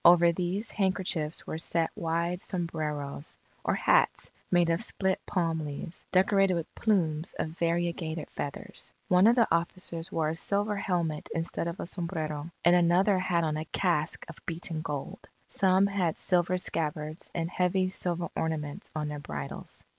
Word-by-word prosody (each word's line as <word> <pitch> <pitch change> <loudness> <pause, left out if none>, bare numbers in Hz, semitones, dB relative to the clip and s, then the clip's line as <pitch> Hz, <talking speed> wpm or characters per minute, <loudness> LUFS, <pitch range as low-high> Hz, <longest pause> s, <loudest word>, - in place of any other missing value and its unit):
Over 170 0 +7
these 185 +5 -1
handkerchiefs 185 -6 0
were 160 - -4
set 165 0 +1
wide 170 +2 -1
sombreros 155 -5 -3 0.3
or - - +1
hats - - +3 0.2
made 175 -2 +4
of 165 - +1
split 190 -4 0
palm 165 -4 0
leaves, 150 +3 -5
decorated 195 0 +4
with 165 -2 -4
plumes 170 -6 +1
of - - -1
variegated 170 -1 -1
feathers. 140 - -4 0.2
One 185 +3 +6
of 235 - +6
the 235 -2 +4
officers 170 0 -1
wore 160 -2 +1
a 160 - -2
silver 205 +4 +1
helmet 170 -6 -1
instead 165 +1 -2
of 170 +1 -4
a - - -3
sombrero, 165 -4 -2 0.2
and 175 +1 +7
another 180 +3 +4
had 175 -2 +1
on 155 -1 0
a 155 - -3
casque 170 -5 0
of 165 - -11
beaten 165 -1 -1
gold. 155 +5 -5 0.2
Some 190 0 +4
had 190 -5 0
silver 180 0 +2
scabbards, 155 -2 -2
and 165 -1 0
heavy 185 +1 +2
silver 175 -2 -1
ornaments 155 -3 -2
on 150 -1 -1
their 150 0 -4
bridles. 75 - -6
170 Hz, 155 wpm, -29 LUFS, 160-185 Hz, 0.3 s, Over